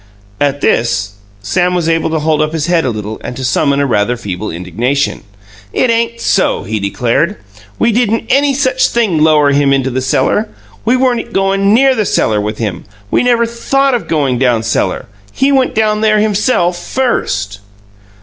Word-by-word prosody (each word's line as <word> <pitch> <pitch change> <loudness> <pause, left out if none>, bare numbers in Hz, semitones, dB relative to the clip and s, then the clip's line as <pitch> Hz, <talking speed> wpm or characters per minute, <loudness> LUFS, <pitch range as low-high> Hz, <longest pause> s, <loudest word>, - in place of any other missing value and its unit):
At 145 0 0
this, 115 -5 0 0.3
Sam 180 - 0
was 170 -2 -1
able 165 -1 +1
to 160 - -1
hold 155 0 0
up 155 +1 -1
his 160 -2 -1
head 170 -2 +1
a - - +1
little 110 -1 -5
and - - -6
to 135 - -5
summon 140 +2 +1
a 140 - +2
rather 120 -1 0
feeble 105 -3 -5
indignation. 115 +12 -2 0.5
"It 250 - +2
ain't 230 0 -1
so," 195 - +1
he 110 +2 -3
declared. 120 - -1 0.4
"We 235 - +2
didn't 225 0 0
any 275 +2 +2
such 260 -1 +1
thing 215 -9 0
lower 150 -2 +4
him 140 0 +2
into 135 -1 +1
the 130 +1 -2
cellar. 130 - 0 0.4
We 245 +3 +3
weren't 245 -2 0
goin' 195 +1 +2
NEAR 270 +2 +4
the 220 -4 -1
cellar 105 -1 +1
with 105 +1 -4
him. 100 -7 -4 0.3
We - - +2
never 240 -1 +2
THOUGHT 270 +4 0
of 220 -9 -2
goin' 140 -6 0
down 120 -4 +2
cellar. 115 - -1 0.3
He 270 - +1
went 265 -2 +1
down 215 -1 +1
there 215 -1 +3
himself, 210 -4 +1
first." 100 - -2
160 Hz, 180 wpm, -13 LUFS, -, 0.5 s, lower